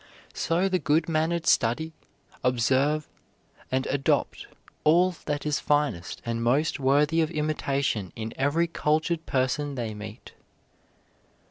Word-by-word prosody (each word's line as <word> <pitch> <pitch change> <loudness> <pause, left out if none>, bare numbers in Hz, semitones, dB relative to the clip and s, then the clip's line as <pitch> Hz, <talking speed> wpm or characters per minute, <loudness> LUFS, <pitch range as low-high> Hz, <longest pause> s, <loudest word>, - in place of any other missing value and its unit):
So 170 +4 +1
the 185 -1 +1
good 155 +1 +1
mannered 165 +1 0
study, 160 +8 +2 0.5
observe, 130 +5 +2 0.6
and 130 +1 0
adopt 140 -1 0 0.4
all 175 +4 +5
that 145 0 -2
is 150 -1 0
finest 145 -13 -1
and 115 0 -2
most 140 +7 +1
worthy 145 +4 +3
of 160 - +1
imitation 140 - -1
in 110 0 -5
every 145 +5 +2
cultured 160 0 0
person 135 +2 0
they 115 -4 -3
meet. 105 +2 -10
145 Hz, 120 wpm, -26 LUFS, 130-160 Hz, 0.6 s, all